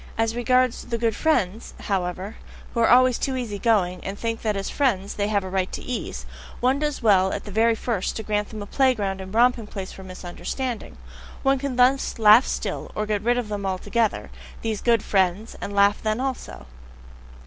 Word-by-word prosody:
As 225 Hz, 0 st, 0 dB
regards 250 Hz, +1 st, +2 dB
"the 235 Hz, -, -1 dB
good 230 Hz, -2 st, 0 dB
friends," 230 Hz, -, 0 dB
however, 190 Hz, +1 st, -2 dB, 0.4 s
who -, -, -2 dB
are 230 Hz, -, +4 dB
always 255 Hz, 0 st, +5 dB
too 270 Hz, -, -1 dB
easy 225 Hz, -6 st, -4 dB
going, 190 Hz, -6 st, +1 dB
and 195 Hz, +1 st, -5 dB
think 230 Hz, 0 st, -3 dB
that 215 Hz, -2 st, -1 dB
as 195 Hz, -, -3 dB
friends 205 Hz, -9 st, 0 dB
they 205 Hz, 0 st, -1 dB
have 205 Hz, -2 st, +1 dB
a -, -, -5 dB
right 190 Hz, -1 st, -1 dB
to -, -, -4 dB
ease, 250 Hz, -2 st, -4 dB, 0.3 s
one 260 Hz, +3 st, +2 dB
does 295 Hz, -4 st, -2 dB
well 190 Hz, -3 st, +4 dB
at -, -, -4 dB
the 205 Hz, -, -8 dB
very 225 Hz, +3 st, +3 dB
first 225 Hz, -4 st, -2 dB
to 220 Hz, -, -4 dB
grant 210 Hz, -1 st, -1 dB
them 215 Hz, -2 st, -6 dB
a -, -, -8 dB
play 260 Hz, +4 st, +2 dB
ground 195 Hz, -3 st, -3 dB
and 190 Hz, 0 st, -8 dB
romping 235 Hz, 0 st, +3 dB
place 195 Hz, -3 st, -6 dB
for 190 Hz, -, -11 dB
misunderstanding 190 Hz, +7 st, -5 dB, 0.5 s
one 270 Hz, -1 st, +3 dB
can 275 Hz, -1 st, -3 dB
thus 255 Hz, +2 st, +3 dB
laugh 220 Hz, +3 st, +7 dB
still; -, -, -3 dB
or 215 Hz, -, -1 dB
get 210 Hz, -1 st, -1 dB
rid 240 Hz, +3 st, +2 dB
of 245 Hz, -3 st, -2 dB
them 205 Hz, -1 st, -4 dB
altogether, 200 Hz, +4 st, -1 dB, 0.3 s
these 220 Hz, -2 st, -2 dB
good 230 Hz, -3 st, +3 dB
friends 190 Hz, +2 st, 0 dB
and 200 Hz, -, -5 dB
laugh 200 Hz, +1 st, +4 dB
then 215 Hz, +1 st, -1 dB
also! 255 Hz, -, -4 dB
220 Hz, 205 wpm, -24 LUFS, 200-245 Hz, 0.5 s, laugh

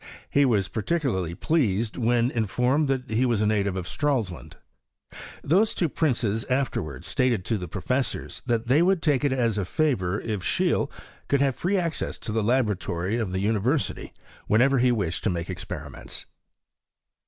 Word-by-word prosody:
He 140 Hz, 0 st, +4 dB
was 105 Hz, -7 st, +2 dB
particularly 110 Hz, -, -1 dB
pleased 115 Hz, -, +1 dB
when 120 Hz, +1 st, +2 dB
informed 125 Hz, +7 st, +1 dB
that 130 Hz, -3 st, -2 dB
he 115 Hz, +3 st, +2 dB
was 120 Hz, -4 st, +2 dB
a 105 Hz, -, +2 dB
native 100 Hz, -3 st, +1 dB
of 90 Hz, -2 st, -4 dB
Stralsund. 125 Hz, -, -2 dB, 0.9 s
These 195 Hz, +9 st, +3 dB
two 170 Hz, -, +1 dB
princes 115 Hz, -8 st, 0 dB
afterwards 125 Hz, -, -2 dB
stated 120 Hz, -7 st, +1 dB
to 110 Hz, +4 st, 0 dB
the 90 Hz, -, -5 dB
professors 115 Hz, +7 st, -2 dB
that 120 Hz, -1 st, +1 dB
tbey 135 Hz, +7 st, +4 dB
would 185 Hz, -1 st, +2 dB
take 145 Hz, -5 st, +2 dB
it 145 Hz, -, +2 dB
as 115 Hz, -5 st, +1 dB
a -, -, 0 dB
favour 100 Hz, -, 0 dB
if 110 Hz, -3 st, -3 dB
Seheele -, -, +1 dB, 0.4 s
could 140 Hz, -1 st, +2 dB
have 135 Hz, -3 st, +2 dB
free 195 Hz, +3 st, 0 dB
access 170 Hz, -3 st, -1 dB
to -, -, -6 dB
the 110 Hz, +1 st, +1 dB
laboratory 105 Hz, -4 st, 0 dB
of 110 Hz, -5 st, -2 dB
the 95 Hz, 0 st, -1 dB
university 115 Hz, +8 st, 0 dB, 0.4 s
whenever 130 Hz, +5 st, +4 dB
he 125 Hz, 0 st, +4 dB
wished 95 Hz, -8 st, -1 dB
to -, -, +3 dB
make 85 Hz, 0 st, -3 dB
experiments. 90 Hz, -, -6 dB
115 Hz, 165 wpm, -26 LUFS, 100-135 Hz, 0.9 s, He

